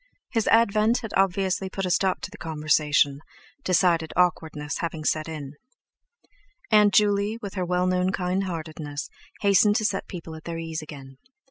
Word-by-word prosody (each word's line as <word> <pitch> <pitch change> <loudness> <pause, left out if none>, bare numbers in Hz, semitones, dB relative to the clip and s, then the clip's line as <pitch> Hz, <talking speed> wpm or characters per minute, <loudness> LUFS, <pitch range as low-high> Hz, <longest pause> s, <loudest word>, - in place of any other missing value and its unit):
His 225 -3 0
advent 225 +1 +3
had 225 -3 -7
obviously 190 0 +1
put 195 0 -3
a 180 - -1
stop 185 +3 +1
to 185 - -6
the 210 - -11
conversation, 150 -2 +1 0.4
decided 170 -3 +2
awkwardness 160 -4 0
having 165 -3 -4
set 155 +1 0
in. 150 -3 -7 1.2
Aunt 210 -1 +6
Juley, 205 +1 +2
with 200 - -5
her 185 -2 -2
well 180 0 +1
known 185 0 +1
kindheartedness, 165 -6 -3 0.3
hastened 200 +1 +4
to 215 -1 +1
set 195 -2 -1
people 165 -3 -8
at 160 0 -11
their 170 -1 -4
ease 165 0 -4
again. 135 -3 -11
180 Hz, 155 wpm, -25 LUFS, 155-200 Hz, 1.2 s, Aunt